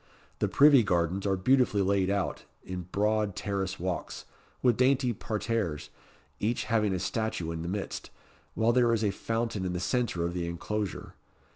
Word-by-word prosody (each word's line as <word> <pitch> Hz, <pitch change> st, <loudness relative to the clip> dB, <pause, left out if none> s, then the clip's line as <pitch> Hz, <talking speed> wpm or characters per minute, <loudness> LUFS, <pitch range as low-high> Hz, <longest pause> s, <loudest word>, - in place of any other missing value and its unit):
The -, -, +2 dB
Privy 140 Hz, -2 st, +6 dB
Gardens 90 Hz, 0 st, 0 dB
are 95 Hz, -, +2 dB
beautifully 120 Hz, -1 st, +3 dB
laid 95 Hz, -1 st, +2 dB
out 100 Hz, -1 st, -1 dB, 0.2 s
in 90 Hz, -2 st, -6 dB
broad 105 Hz, -1 st, +1 dB
terrace 95 Hz, -2 st, -3 dB
walks, 90 Hz, 0 st, -4 dB, 0.4 s
with 125 Hz, -3 st, +4 dB
dainty 130 Hz, 0 st, +3 dB
parterres, 110 Hz, -7 st, -2 dB, 0.5 s
each 115 Hz, +3 st, 0 dB
having 110 Hz, -3 st, +1 dB
a 95 Hz, -, 0 dB
statue 95 Hz, -3 st, -2 dB
in 80 Hz, 0 st, -4 dB
the 85 Hz, -, -4 dB
midst, 100 Hz, +1 st, -4 dB, 0.5 s
while 115 Hz, +1 st, +3 dB
there 120 Hz, -1 st, +4 dB
is 110 Hz, -, -2 dB
a 105 Hz, -, +2 dB
fountain 115 Hz, -1 st, -2 dB
in 90 Hz, -1 st, -2 dB
the 90 Hz, -, -2 dB
centre 105 Hz, -4 st, 0 dB
of 85 Hz, -, -2 dB
the 85 Hz, -1 st, -2 dB
inclosure. 100 Hz, +3 st, -4 dB
100 Hz, 165 wpm, -29 LUFS, 90-115 Hz, 0.5 s, Privy